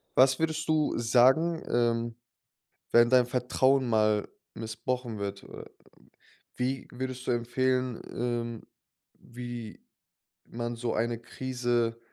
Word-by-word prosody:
Was 130 0 +5
würdest 160 -1 -1
du 155 -1 +2
sagen, 130 +8 +4
ähm, 115 -1 +1 0.8
wenn 120 0 +6
dein 125 -1 +5
Vertrauen 130 +1 +2
mal 110 -2 +2 0.3
missbraucht 115 +1 -4
wird? 100 0 -4
Äh, - - -10 0.9
wie 130 +1 -2
würdest 130 0 -5
du - - +2
empfehlen 125 +1 0
ähm, 120 -1 -3 0.5
wie 120 -2 -8 0.7
man 120 0 -4
so 115 0 -2
eine 115 +1 -1
Krise 120 -1 -1
120 Hz, 110 wpm, -29 LUFS, 115-130 Hz, 0.9 s, wenn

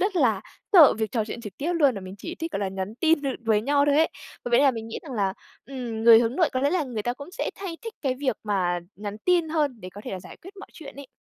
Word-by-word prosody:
rất 390 0 0
là 225 - +3 0.3
sợ 325 -7 +8
việc 220 +1 -3
trò 225 -3 0
chuyện 230 - -7
trực 210 -4 -8
tiếp 330 +5 -1
luôn, 285 -7 +4
và 200 - -5
mình 185 0 -9
chỉ 335 - -6
thích, 330 -2 -5
gọi 200 - -2
là, 195 - -1
nhắn 190 +2 -5
tin 325 -2 +3
th - - -3 0.2
với 215 -2 +3
nhau 285 +2 +3
thôi 290 0 +3
ấy. 320 - +4 0.4
V - - -2
với 240 - +5
là 280 - +5
mình 225 -2 -6
nghĩ - - -5
rằng 290 -5 -9
là, 200 -4 0 0.3
ừm, 245 -5 -5
người 230 -1 +9
hướng 235 +3 -1
nội 335 -5 +3
có 255 - 0
lẽ 285 +2 +2
là 345 -4 +1
người 230 -5 -4
ta 240 - -1
cũng 285 +6 -10
sẽ - - -3
thay 375 -4 -6
thích 455 -1 -7
cái 265 -2 0
việc 255 -6 0
mà 185 -4 0 0.2
nhắn 205 0 -6
tin 350 -3 +3
hơn 295 -8 -1
để 185 - -8
có 205 - -8
thể - - -5
là 185 - -5
giải - - -12
quyết 390 +3 -14
mọi 395 - -11
chuyện 300 -5 -11
ấy. 280 -2 -10
255 Hz, 305 wpm, -25 LUFS, 215-315 Hz, 0.4 s, người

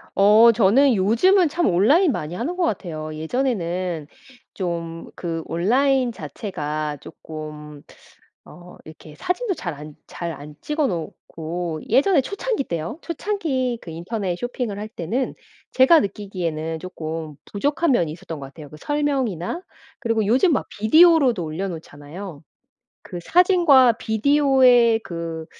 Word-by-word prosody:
어 215 +4 +7
저는 235 +5 +4
요즘은 235 - +4
참 345 +3 0
온라인 275 - +4
많이 155 -4 -4
하는 285 - -3
것 365 - +1
같아요. 155 - -3
예전에는 175 - -2 0.5
좀 170 -3 -4
그 165 -2 -4
온라인 250 +8 +1
자체가 155 -10 -5
쪼끔 150 -2 -10 0.6
어 180 0 -14
이렇게 155 -1 -13
사진도 380 - -2
잘 175 - -5
안 150 +1 -11
잘 170 -2 -5
안 150 +1 -11
찍어 300 -2 0
놓고 165 -1 -5
예전에 280 - +4
초창기 400 - -3
때요. 170 - -4
초창기 295 - -2
그 - - -10
인터넷 180 +3 -3
쇼핑을 245 -3 -4
할 215 +1 -6
때는 225 +6 -3 0.4
제가 265 +5 +6
느끼기에는 170 -6 -4
쪼끔 160 -3 -6 0.2
부족한 290 +9 0
면이 170 -11 +1
있었던 165 -1 -8
것 135 - -8
같아요 145 +2 -12
그 150 - -12
설명이나. 275 - -2 0.4
그리고 230 -4 0
요즘 255 - +3
막 - - -1
비디오로도 270 - +5
올려놓잖아요. 160 0 -7 0.6
그 175 - -8
사진과 340 - +5
비디오의 250 0 +4
그 165 -4 -6
200 Hz, 280 characters per minute, -22 LUFS, 165-270 Hz, 0.6 s, 어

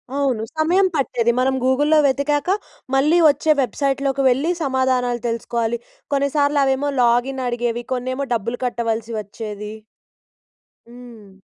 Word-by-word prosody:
అవును. 265 -6 0 0.2
సమయం 360 +5 +3
పట్టేది, 240 -4 +1
మనం 265 +1 +2
గూగుల్‌లో 290 +4 +3
వెతికాక, 280 +3 +1 0.5
మళ్ళీ 300 +5 +3
వచ్చే 295 +2 +2
వెబ్సైట్‌లోకి 275 +2 -1
వెళ్ళి, 275 +7 +1
సమాధానాలు 260 -3 0
తెలుసుకోవాలి. 235 0 -2 0.3
కొన్నిసార్లు 285 +1 +2
అవేమో 270 +2 0
లాగిన్ 245 +3 +1
అడిగేవి, 240 0 -2
కొన్నేమో 255 +2 -3
డబ్బులు 230 +3 -3
కట్టవలసి 230 -2 -2
వచ్చేది. 210 0 -7 1.1
హ్మ్. 235 -5 -14
255 Hz, 110 wpm, -20 LUFS, 235-280 Hz, 1.1 s, సమయం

